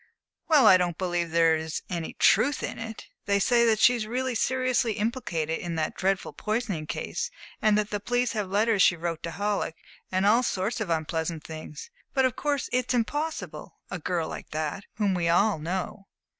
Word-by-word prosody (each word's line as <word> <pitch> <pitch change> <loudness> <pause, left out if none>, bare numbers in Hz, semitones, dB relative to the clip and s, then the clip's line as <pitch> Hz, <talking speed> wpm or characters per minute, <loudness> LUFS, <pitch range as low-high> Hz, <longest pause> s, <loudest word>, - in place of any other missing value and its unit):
"Well, 300 -7 +6
I 185 - +9
don't 175 -2 -1
believe 175 -2 -1
there 165 0 +4
is 160 0 -4
any 170 -3 -4
truth 280 +2 +3
in - - -4
it. 225 -1 -7 0.2
They 200 0 +3
say 235 +2 +4
that 220 -1 +4
she 235 +3 +6
is 225 -3 -3
really 255 +2 -1
seriously 255 0 +1
implicated 205 - -2
in 170 -1 -4
that 155 -1 -1
dreadful 190 0 -1
poisoning 215 -8 -2
case; 470 - -3 0.3
that 210 -1 +2
the 205 - -1
police 245 +3 0
have 210 -4 -3
letters 210 +1 +2
she 180 - +6
wrote 165 -1 -3
to 170 - -4
Halleck, 200 -2 -2 0.4
and 185 +1 +1
all 225 +4 +5
sorts 210 -1 -1
of 205 - -3
unpleasant 160 0 -2
things. 155 - -9 0.2
But 265 -1 +4
of 255 - 0
course 290 -2 -1
it's 250 0 +1
impossible 295 +7 -3
a 185 - -3
girl 170 0 -1
like - - -7
that, 155 +5 -3
whom 205 -2 +1
we 175 -2 0
all 195 +1 +3
know!" 185 +4 -4
200 Hz, 185 wpm, -27 LUFS, 170-235 Hz, 0.4 s, I